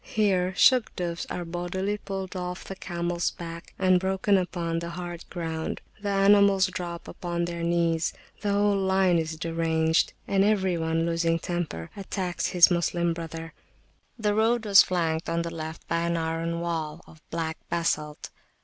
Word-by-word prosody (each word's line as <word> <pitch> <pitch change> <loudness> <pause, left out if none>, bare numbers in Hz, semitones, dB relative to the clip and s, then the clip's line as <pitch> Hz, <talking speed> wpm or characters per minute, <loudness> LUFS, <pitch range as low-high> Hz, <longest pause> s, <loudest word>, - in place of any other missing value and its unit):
Here 190 -4 +1
Shugdufs 180 -9 +3
are 175 - -4
bodily 180 +4 -2
pulled 195 -1 -5
off 180 0 -4
the 195 - -7
camels 175 -2 -2
back 170 0 -9
and 185 -1 +4
broken 190 +2 +1
upon 170 -3 -1
the 170 0 -5
hard 175 0 -6
ground; 160 -2 -3 0.2
the 205 - -2
animals 200 -1 +5
drop 170 -2 -5
upon 170 -1 -3
their 170 0 -4
knees, 170 -1 +1 0.3
the 205 - 0
whole 205 0 +3
line 190 -2 +3
is 160 0 -3
deranged, 160 0 +1
and 195 -1 +3
every 195 -3 +2
one, 165 0 0
losing 165 0 +1
temper, 165 - -4
attacks 190 -2 -2
his 175 0 +6
Moslem 170 0 +1
brother. 165 0 -7 0.6
The 210 -2 +1
road 225 +2 +2
was 200 -2 +8
flanked 165 -3 0
on 170 0 0
the 170 0 -5
left 160 0 -7
by 170 - 0
an 170 0 0
iron 165 +1 -2
wall 165 -1 -3
of 155 - -17
black 160 -1 -3
basalt. 150 -3 -1
175 Hz, 160 wpm, -27 LUFS, 165-190 Hz, 0.6 s, was